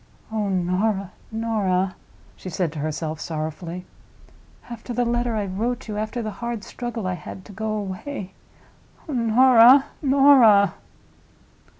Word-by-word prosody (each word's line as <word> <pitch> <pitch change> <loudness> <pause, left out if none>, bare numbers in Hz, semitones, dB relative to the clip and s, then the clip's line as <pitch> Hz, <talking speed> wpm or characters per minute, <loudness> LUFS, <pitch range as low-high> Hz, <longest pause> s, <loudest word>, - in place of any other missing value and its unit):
"Oh, 215 -2 -1
Norah, 190 +2 0 0.2
Norah!" 200 -5 0 0.4
she 185 - -8
said 175 -2 -1
to 155 - -6
herself, 155 +1 -3
sorrowfully. 165 +3 -5 0.8
"After 240 +1 -7
the 245 +1 0
letter 240 0 0
I 210 -2 -1
wrote 230 +7 -3
you—after 215 +3 -3
the 215 - -4
hard 235 -3 -4
struggle 240 -4 -5
I 185 - -1
had 180 +2 -9
to - - -12
go 215 +2 -3
away! 200 +1 -5 0.7
Oh, 305 - -5
Norah, 245 +2 +6 0.2
Norah!" 265 -8 +6
215 Hz, 125 wpm, -23 LUFS, 185-240 Hz, 0.8 s, Norah